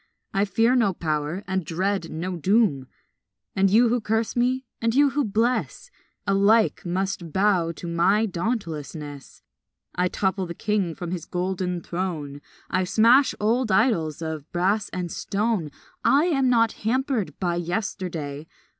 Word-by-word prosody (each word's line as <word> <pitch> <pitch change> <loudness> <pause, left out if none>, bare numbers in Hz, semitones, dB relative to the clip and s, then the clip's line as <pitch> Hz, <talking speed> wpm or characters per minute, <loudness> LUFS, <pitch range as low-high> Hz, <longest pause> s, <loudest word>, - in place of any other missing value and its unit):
I 195 0 +2
fear 225 +5 +2
no 210 -7 +2
power 155 +3 -2
and 190 -1 -1
dread 185 +2 -1
no 180 +4 -4
doom; 175 - +2 0.7
And 195 0 +3
you 230 +4 +5
who 240 0 +1
curse 220 +1 -1
me 255 +2 +1 0.2
and 230 +1 +1
you 285 0 +5
who 290 +2 +1
bless 240 - -1 0.3
Alike 205 +3 +3
must 185 -2 -2
bow 190 -2 +2
to 175 - -8
my 185 +6 +2
dauntlessness. 160 - -5 0.5
I 180 0 +1
topple 190 0 -1
the 170 - -6
king 200 -5 -1
from 175 -2 -6
his 175 -3 -4
golden 180 -1 -2
throne, 160 -6 -4 0.3
I 185 +1 0
smash 235 +8 +4
old 225 +2 +1
idols 180 - +1
of 160 -2 -5
brass 195 +4 +1
and 180 -2 -4
stone, 205 -5 -1 0.3
I 285 +4 +4
am 270 -7 +2
not 230 -2 +4
hampered 230 - -1
by 175 -2 0
yesterday. 170 -5 -4
190 Hz, 145 wpm, -24 LUFS, 170-225 Hz, 0.7 s, you